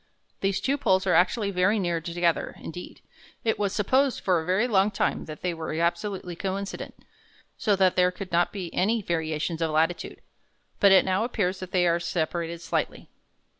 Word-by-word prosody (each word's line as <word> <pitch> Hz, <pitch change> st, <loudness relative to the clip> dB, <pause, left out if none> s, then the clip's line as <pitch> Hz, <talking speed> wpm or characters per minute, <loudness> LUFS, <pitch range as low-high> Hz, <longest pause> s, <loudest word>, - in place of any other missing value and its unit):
These 195 Hz, 0 st, 0 dB
two 280 Hz, +2 st, 0 dB
poles 190 Hz, -5 st, +2 dB
are 185 Hz, -, +2 dB
actually 200 Hz, +5 st, +2 dB
very 185 Hz, +3 st, +2 dB
near 175 Hz, -4 st, -1 dB
together; 170 Hz, +1 st, -1 dB
indeed, 175 Hz, +2 st, -9 dB, 0.4 s
it 225 Hz, -, 0 dB
was 200 Hz, -2 st, 0 dB
supposed 260 Hz, +7 st, +2 dB
for 180 Hz, -4 st, +2 dB
a -, -, -8 dB
very 190 Hz, +7 st, +2 dB
long 200 Hz, -3 st, +3 dB
time 205 Hz, -, -1 dB
that 155 Hz, -1 st, -9 dB
they 180 Hz, -1 st, 0 dB
were 165 Hz, -1 st, -5 dB
absolutely 175 Hz, +2 st, -2 dB
coincident, 195 Hz, +2 st, -4 dB, 0.6 s
so 210 Hz, -2 st, +1 dB
that 190 Hz, -1 st, +3 dB
there 180 Hz, 0 st, +4 dB
could 185 Hz, +1 st, -8 dB
not 170 Hz, +1 st, +2 dB
be 185 Hz, -4 st, -6 dB
any 215 Hz, +3 st, +1 dB
variations 160 Hz, -1 st, -2 dB
of 165 Hz, -, +1 dB
latitude. 160 Hz, +3 st, -1 dB, 0.6 s
But 200 Hz, -, +6 dB
it 190 Hz, -, +6 dB
now 190 Hz, +3 st, +1 dB
appears 195 Hz, -6 st, -1 dB
that 185 Hz, -, -7 dB
they 180 Hz, -1 st, +2 dB
are 170 Hz, 0 st, +2 dB
separated 170 Hz, 0 st, -2 dB
slightly. -, -, -3 dB
185 Hz, 180 wpm, -26 LUFS, 170-200 Hz, 0.6 s, But